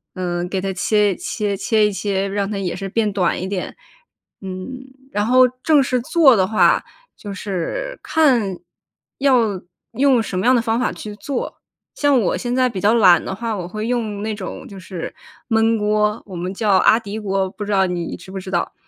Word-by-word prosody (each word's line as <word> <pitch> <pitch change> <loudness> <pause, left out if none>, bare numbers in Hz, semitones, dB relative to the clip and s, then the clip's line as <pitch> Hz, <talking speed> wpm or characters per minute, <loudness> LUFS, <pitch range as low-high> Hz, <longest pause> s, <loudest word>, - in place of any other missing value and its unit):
嗯， 175 -1 -2
给 190 - -1
它 190 0 -2
切 205 +2 +2
一 - - -11
切 210 -3 -2
切 215 +2 +2
一 210 - +1
切， 195 0 -1
让 200 0 -2
它 210 - -3
也 190 -3 -2
是 195 -1 -5
变 215 0 0
短 185 -4 +1
一 185 - -3
点， 190 -2 -4 0.7
嗯。 190 +7 -6 0.3
然 205 0 0
后 255 +1 +6 0.2
正 300 -3 +4
式 255 -2 0
做 275 -1 +5
的 190 -2 +2
话 215 - +3 0.3
就 205 - -8
是 350 - -4
看 250 - +2 0.6
要 235 -9 +2 0.3
用 260 -4 +3
什 185 - -3
么 190 - -2
样 255 - +6
的 - - +4
方 225 0 0
法 250 - 0
去 210 -1 -8
做， 260 +5 -5 0.3
像 285 -3 +3
我 205 - +1
现 245 -1 -2
在 255 0 +3
比 205 -7 -5
较 210 +3 +4
懒 185 -7 +6
的 190 - -4
话， 230 0 -3
我 180 -3 -5
会 215 +4 -5
用 220 -4 -2
那 220 - -2
种 200 -3 -7
就 195 - -10
是 180 -2 -7 0.4
焖 225 0 +3
锅， 210 +1 0
我 190 -3 -9
们 180 +2 -3
叫 210 +2 0
阿 220 - +5
迪 210 -1 -6
锅， 195 -2 -1
不 210 - -7
知 205 - -4
道 195 -1 +3
你 175 -2 -3
知 190 - -13
不 195 - -5
知 185 0 -8
道， - - -1
210 Hz, 225 characters per minute, -20 LUFS, 190-235 Hz, 0.7 s, 后